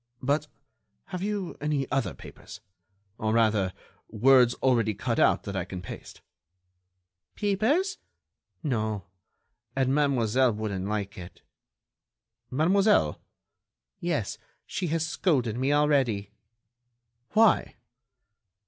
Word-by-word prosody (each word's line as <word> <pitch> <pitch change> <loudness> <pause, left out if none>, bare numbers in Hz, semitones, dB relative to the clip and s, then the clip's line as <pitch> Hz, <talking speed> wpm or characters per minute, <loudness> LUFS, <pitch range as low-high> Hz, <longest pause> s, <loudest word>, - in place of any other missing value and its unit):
"But, 145 +3 +1 0.6
have 180 -2 -5
you 200 -3 -3
any 145 -3 0
other 130 -10 0
papers?... 105 - -12 0.6
Or, 110 -2 0
rather, 110 -5 +2 0.4
words 125 +2 +5
already 115 -5 +1
cut 115 +2 -1
out - - +4
that 100 -2 -5
I 95 - -1
can 90 +1 -7
paste?" 90 - -10 1.1
"Papers?... 225 - +1 0.6
No.... 110 - -1 0.7
And 135 0 +1
Mademoiselle 130 -4 +2
wouldn't 100 -3 -3
like 105 -2 -3
it." 90 0 -11 1.1
"Mademoiselle?" 160 - +3 0.8
"Yes, - - -2 0.3
she 180 - -3
has 165 0 0
scolded 140 - 0
me 130 +3 +1
already." 135 -9 +2 1.0
"Why?" 220 -1 +4
130 Hz, 100 wpm, -27 LUFS, 105-155 Hz, 1.1 s, words